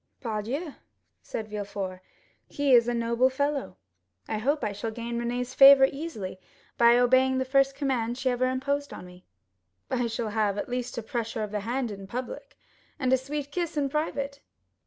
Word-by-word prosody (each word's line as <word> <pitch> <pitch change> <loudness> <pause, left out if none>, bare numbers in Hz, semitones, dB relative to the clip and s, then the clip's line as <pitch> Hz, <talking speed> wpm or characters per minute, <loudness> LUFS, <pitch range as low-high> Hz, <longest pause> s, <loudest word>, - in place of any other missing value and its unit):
"Pardieu!" 245 +7 -3 0.5
said 220 - -5
Villefort, 200 -3 -5 0.5
"he 285 -2 +1
is 235 -1 +6
a 240 - +1
noble 235 +2 +2
fellow. 280 - -2 0.5
I 215 - -2
hope 285 +7 0
I 210 - 0
shall 205 +3 -4
gain 235 +1 -4
Renée's 245 +1 -3
favor 275 0 +9
easily 275 - -6 0.4
by 235 0 +6
obeying 260 +1 +4
the 260 - 0
first 275 +1 +3
command 250 -4 -1
she 260 -1 0
ever 255 +1 +1
imposed 280 +2 -2
on - - -9
me. 180 0 -15 0.7
I 245 -2 +1
shall 225 -1 -3
have 210 -1 0
at - - -3
least 245 0 -3
a 235 - -3
pressure 225 -1 -3
of 210 - -5
the 210 - -1
hand 240 +3 -2
in 195 -1 -8
public, 250 +5 -6 0.4
and 260 -3 +1
a - - +8
sweet 285 +2 -5
kiss 340 -1 -3
in 280 -1 +1
private." 280 -1 -2
245 Hz, 180 wpm, -27 LUFS, 225-275 Hz, 0.7 s, favor